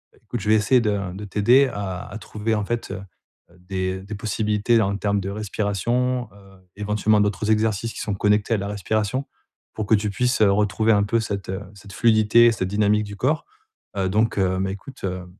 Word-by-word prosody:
Écoute, 115 +2 -6
je 105 - -2
vais 110 - +6
essayer 110 +4 +3
de 100 -4 -1
de 100 +3 -8
t'aider 120 +8 +4
à 95 -3 -4
à 105 - -7
trouver 110 +1 -3
en 105 -1 -1
fait, 120 +1 -3
heu, 95 - -5 0.6
des 95 0 -3
des 105 +2 -7
possibilités, 105 +2 +1
en 100 -1 0
termes 100 0 0
de 95 - -4
respiration, 110 +4 -1
heu, 95 -2 -19
éventuellement, 105 +1 +1
d'autres 105 +1 -1
exercices, 110 +1 0
qui - - -8
sont 105 - -2
connectés 105 +3 +1
à - - 0
la 100 +1 -4
respiration, 110 +5 -1 0.5
pour 110 - -3
que 110 - +5
tu 105 0 -1
puisses, 125 +3 0
heu, 100 -2 +6
retrouver 105 +2 +2
un 100 -2 +4
peu 115 +3 +1
cette 100 -4 -4 0.2
cette 100 -1 -13
fluidité, 115 +1 +5
cette 95 -4 -2
dynamique 105 +1 +2
du 100 -1 -8
corps, 150 +8 0 0.5
heu, 95 -1 +1
donc 110 +2 +1
heu, 95 -1 +1
mais 95 0 -1
écoute, 120 +7 -11
heu, 90 -1 -3
105 Hz, 200 wpm, -23 LUFS, 100-110 Hz, 0.6 s, vais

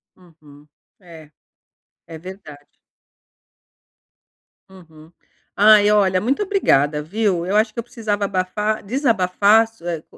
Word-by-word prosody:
Uhum, 150 -5 -21 0.3
é, 165 -5 -15 0.8
é 160 - -10
verdade. 155 -5 -12 2.0
Uhum. 165 -4 -18 0.4
Ai, 210 0 +5
olha 190 -3 +2
muito 270 - -1
obrigada, 150 - +1
viu? 185 +1 -2
Eu 190 +3 -2
acho 215 0 +1
que - - -7
eu - - -4
precisava 215 -3 -4
abafar, 200 +3 -3
desabafar 220 -3 +2
so 225 -6 -20
eh, 165 -3 -4
190 Hz, 110 wpm, -19 LUFS, 165-215 Hz, 2.0 s, Ai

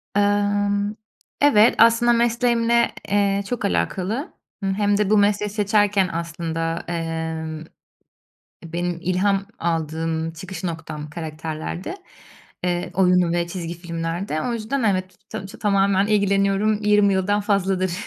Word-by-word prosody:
Emm, 205 0 +1 0.5
evet 230 -6 +6
aslında 230 +1 +5
mesleğimle, 235 0 +2 0.2
eee, 200 0 +1
çok 245 - -2
alakalı. 185 - -1 0.3
Hımm, 195 0 0
hem 205 0 +1
de 210 -1 +1
bu 215 - +4
mesleği 205 0 +2
seçerken 205 -2 +2
aslında, 165 0 -3
emm, 160 -1 -3 0.8
eee, 165 -1 -16
benim 175 0 -2
ilham 195 +2 +1
aldığım 160 0 -2
çıkış 185 +4 -8
noktam 160 -3 -5
karakterlerdi, 160 - -5 0.7
eee, 175 -1 -1
oyun 180 -2 +3
ve 170 0 0
çizgi 170 -1 -5
filmlerde. 165 0 -3
O 245 - -1
yüzden 235 +4 -2
evet, 185 -4 0
ta 210 -3 -6
çö 195 - -12
tamamen 200 -1 +2
ilgileniyorum, 200 0 +2
20 210 -1 +4
yıldan 200 +2 +1
fazladır 195 -3 0
195 Hz, 125 wpm, -22 LUFS, 170-205 Hz, 0.8 s, evet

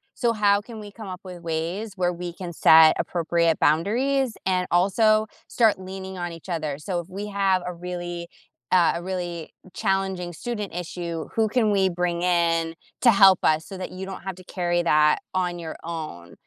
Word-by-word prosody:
So 235 -1 +1
how 205 -2 +3
can 220 +1 -10
we 205 -1 -9
come 215 -1 -10
up 185 0 -7
with 180 -2 -9
ways 170 +6 -3
where 180 -1 +1
we 175 0 -6
can 175 0 -7
set 160 0 +7
appropriate 170 -1 +1
boundaries 240 - +2
and 185 -1 +1
also 215 +4 +3 0.2
start 220 -5 +2
leaning 190 0 -7
on 175 -1 -4
each 165 +2 -11
other? 155 -4 -3
So 175 +3 -3
if 170 - -16
we 200 +2 -5
have 195 -2 +1
a - - -2
really, 175 0 -6 0.4
uh, 180 -2 +4
a 170 - -5
really 175 -3 -4 0.2
challenging 190 -3 -1
student 210 +1 -5
issue, 170 -2 -5
who 220 -1 +3
can 220 -1 +2
we 195 -2 +3
bring 175 0 -1
in 165 -2 +1 0.3
to 240 - +7
help 195 -3 +7
us 155 +1 +2
so 195 - -8
that 185 - -6
you 190 +1 -7
don't 190 - -8
have 190 - -4
to 185 - -13
carry 175 -1 -1
that 150 -2 +4 0.2
on 180 -1 -1
your 165 -2 -6
own?" 155 - -7
180 Hz, 190 wpm, -24 LUFS, 170-195 Hz, 0.4 s, set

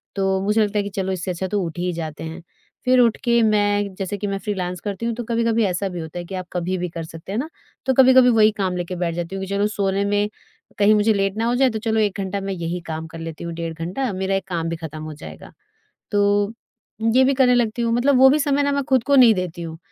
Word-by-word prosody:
तो 195 -1 +1
मुझे 210 +2 +2
लगता 210 0 -2
है - - 0
कि 200 - -5
चलो 190 -1 -1
इससे 185 0 -3
अच्छा 180 +2 -3
तो 205 +1 -1
उठ 165 -1 -6
ही 180 +1 -1
जाते 160 -2 -6
हैं। 165 +2 -7 0.4
फिर 255 0 +4
उठके 235 0 +3
मैं 205 -2 +1
जैसे 195 +1 -4
कि 205 - -3
मैं 195 0 -2
फ्रीलांस 185 -4 -3
करती 205 +2 -4
हूँ 235 - 0
तो 240 - -4
कभी-कभी 230 0 +1
ऐसा 190 +1 -1
भी 180 -1 -6
होता 160 +1 -6
है 175 - -6
कि 190 - -7
आप 185 -1 -5
कभी 180 +1 -1
भी 180 0 -3
कर 165 0 -6
सकते 165 +3 -10
हैं 210 - -1
ना। 300 +5 -4 0.4
तो 265 - +2
कभी-कभी 260 -1 +6
वही 220 -2 +5
काम 190 -3 -1
लेकर 175 +1 -4
बैठ 170 -1 -2
जाती 175 +2 -4
हूँ 195 - -4
कि - - -11
चलो 200 +1 +1
सोने 200 -2 -1
में 205 +1 +1 0.5
कहीं 205 +1 +5
मुझे 210 +1 +3
लेट 195 0 -1
ना 225 - 0
हो 240 +1 +1
जाए 260 +1 +4
तो 220 -2 -4
चलो 220 0 0
1 205 -2 0
घंटा 195 +1 -3
मैं 195 0 -3
यही 170 0 -3
काम 160 0 -5
कर 165 0 -10
लेती 165 0 -7
हूँ 170 0 -5
1:30 165 0 -4
घंटा 180 +10 -3
मेरा 190 +1 -1
एक 195 0 -3
काम 165 -3 -2
भी 165 - -2
खत्म 160 -2 -7
हो 155 0 -6
जाएगा। 80 - -11 0.6
तो 205 0 +2 0.6
ये 260 +1 +6
भी 275 +1 +3
करने 255 -2 +4
लगती 240 -1 0
हूँ। 230 -1 +1
मतलब 255 +3 +3
वो 265 +1 +8
भी 295 - +3
समय 285 -1 +1
ना 285 0 +1
मैं 280 0 0
खुद 260 -3 +2
को 285 -1 +3
नहीं 245 -4 +7
देती 180 -2 -4
हूँ 160 -1 -7
200 Hz, 270 wpm, -21 LUFS, 175-225 Hz, 0.6 s, वो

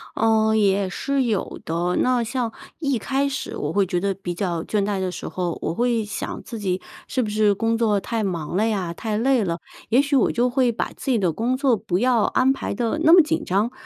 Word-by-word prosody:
呃， 220 0 +3
也 200 -2 +2
是 275 +7 -1
有 220 -5 -2
的， 175 +2 -1
那 250 -1 +2
像 235 0 -2 0.3
一 280 -5 0
开 270 +5 0
始 275 -1 -4
我 150 +2 -3
会 200 +1 +3
觉 180 -1 -1
得 200 +2 0
比 185 -2 -5
较 170 -2 -2
倦 210 -2 0
怠 200 -1 -1
的 185 -1 -2
时 - - -6
候， 175 -2 -3
我 - - -2
会 235 +1 +1
想 210 - -5
自 235 - -7
己 185 -2 -1 0.3
是 260 - 0
不 220 - -2
是 210 -1 +3
工 225 +3 0
作 215 -3 +2
太 225 +2 -2
忙 175 -5 -3
了 210 +4 +2
呀， 190 -6 -1
太 215 +4 -3
累 250 0 +2
了， 170 -3 -2 0.3
也 250 +4 +5
许 285 0 0
我 260 - +3
就 245 +2 +1
会 250 -1 +2
把 230 - -3
自 270 - -3
己 245 - +3
的 180 -4 +1
工 245 +6 0
作 265 -3 +3
不 185 -3 -2
要 245 -1 +3
安 260 +5 +3
排 - - -4
得 235 +8 -1
那 320 - +6
么 350 +1 +9
紧 320 +1 -1
张， 205 +6 0
220 Hz, 250 characters per minute, -23 LUFS, 190-250 Hz, 0.3 s, 么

